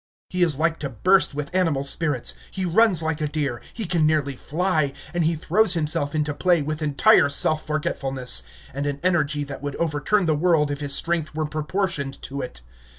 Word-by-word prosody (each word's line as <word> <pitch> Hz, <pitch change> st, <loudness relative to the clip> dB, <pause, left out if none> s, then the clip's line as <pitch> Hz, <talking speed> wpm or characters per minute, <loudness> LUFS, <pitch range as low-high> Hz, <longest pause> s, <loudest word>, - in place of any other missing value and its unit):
He 180 Hz, -, -1 dB
is 165 Hz, -6 st, +3 dB
like 160 Hz, +1 st, 0 dB
to 140 Hz, -, -4 dB
burst 185 Hz, -, +2 dB
with 150 Hz, +4 st, -5 dB
animal 165 Hz, -7 st, +1 dB
spirits; 140 Hz, -2 st, 0 dB, 0.2 s
he 190 Hz, -, -4 dB
runs 185 Hz, -1 st, +4 dB
like 160 Hz, -1 st, -2 dB
a 150 Hz, -, 0 dB
deer; 145 Hz, -6 st, -3 dB
he 225 Hz, -, -3 dB
can 170 Hz, -3 st, +2 dB
nearly 145 Hz, -3 st, 0 dB
fly; 155 Hz, -1 st, -1 dB, 0.2 s
and 175 Hz, -2 st, +1 dB
he 165 Hz, +1 st, +1 dB
throws 185 Hz, +4 st, +2 dB
himself 150 Hz, -2 st, -1 dB
into 150 Hz, -1 st, 0 dB
play 175 Hz, +3 st, +2 dB
with 155 Hz, +2 st, -4 dB
entire 145 Hz, -1 st, +4 dB
self 155 Hz, +2 st, +2 dB
forgetfulness, 135 Hz, -4 st, 0 dB, 0.3 s
and 140 Hz, +2 st, -3 dB
an 140 Hz, 0 st, -3 dB
energy 155 Hz, -5 st, +1 dB
that 140 Hz, -1 st, -8 dB
would 145 Hz, -1 st, -4 dB
overturn 170 Hz, +5 st, 0 dB
the 160 Hz, -, +2 dB
world 150 Hz, -2 st, +2 dB
if 145 Hz, -, -4 dB
his 145 Hz, -2 st, 0 dB
strength 165 Hz, -3 st, -2 dB
were 155 Hz, 0 st, -1 dB
proportioned 150 Hz, -2 st, -3 dB
to 140 Hz, +1 st, -5 dB
it. 125 Hz, -, -8 dB
155 Hz, 195 wpm, -23 LUFS, 145-170 Hz, 0.3 s, runs